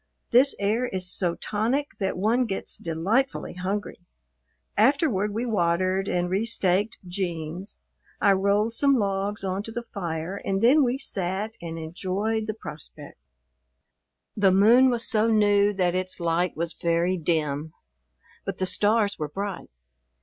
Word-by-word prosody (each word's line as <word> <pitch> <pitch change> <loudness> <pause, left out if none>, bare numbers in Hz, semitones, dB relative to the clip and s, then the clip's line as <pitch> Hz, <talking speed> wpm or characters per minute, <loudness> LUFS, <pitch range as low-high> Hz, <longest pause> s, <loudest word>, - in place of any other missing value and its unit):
This 260 +4 +5
air 215 +5 0
is 185 -3 -1
so 175 -3 +2
tonic 240 +8 -1
that 190 -2 -1
one 225 +6 +2
gets 195 -4 -3
delightfully 195 +12 -1
hungry. 195 +3 -4 0.8
Afterward 225 - +2
we 225 +4 -2
watered 185 -2 +1
and 175 0 0
restaked 200 +1 0
"Jeems," 175 0 -4 0.4
I 200 - +4
rolled 200 +3 +2
some 280 +3 +3
logs 200 -2 -1
on 190 0 -2
to 225 - -8
the 235 +1 -5
fire, 175 0 -4
and 195 0 -1
then 265 +8 +5
we 250 0 0
sat 195 -3 -2
and 165 -1 -6
enjoyed 190 +7 -2
the 215 - -3
prospect. 150 -6 -6 1.2
The 200 -2 +4
moon 230 +7 +6
was 235 -2 0
so 220 0 +2
new 205 -2 +4
that 180 -3 +1
its 185 0 -1
light 170 -1 0
was 170 0 -2
very 170 +2 0
dim, 155 -3 -1 0.7
but 195 -1 -4
the 185 - 0
stars 205 +1 +1
were 150 -1 -3
bright. 195 +2 -5
195 Hz, 140 wpm, -25 LUFS, 180-220 Hz, 1.2 s, moon